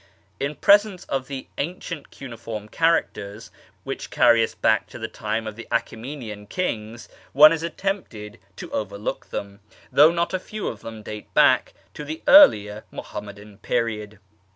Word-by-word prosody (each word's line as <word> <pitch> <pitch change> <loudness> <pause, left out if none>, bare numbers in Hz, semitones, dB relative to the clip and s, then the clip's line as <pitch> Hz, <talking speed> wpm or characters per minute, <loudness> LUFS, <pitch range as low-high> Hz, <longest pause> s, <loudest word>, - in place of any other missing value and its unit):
In 140 +2 -2
pre 200 +7 +7
sence 205 -4 -10
of 135 -1 -2
the 135 -2 -6
ancient 165 -1 -5
cuneiform 115 -4 -8
characters, 115 -9 -1 0.3
which - - -6
carry 115 -1 +5
us - - -3
back 110 - +2
to - - -11
the 110 - -4
time 110 +1 -3
of 110 -1 -6
the 115 - -10
Achteraenian 115 -3 -4
kings, 115 -8 -4 0.3
one 150 +3 +9
is 165 0 -3
tempted 120 - -4 0.2
to - - -9
over 100 -2 -3
look 105 - -5
them, 100 0 -6 0.3
though 150 +2 +7
not 170 +1 -1
a 185 - 0
few 215 +3 -6
of 105 - -9
them 110 -1 -9
date 105 0 -8
back - - +4 0.2
to 150 - -7
the 155 +2 -7
earlier 105 - +7
Muhammadan 105 0 -9
period. 105 -2 -2
115 Hz, 160 wpm, -23 LUFS, 105-155 Hz, 0.3 s, one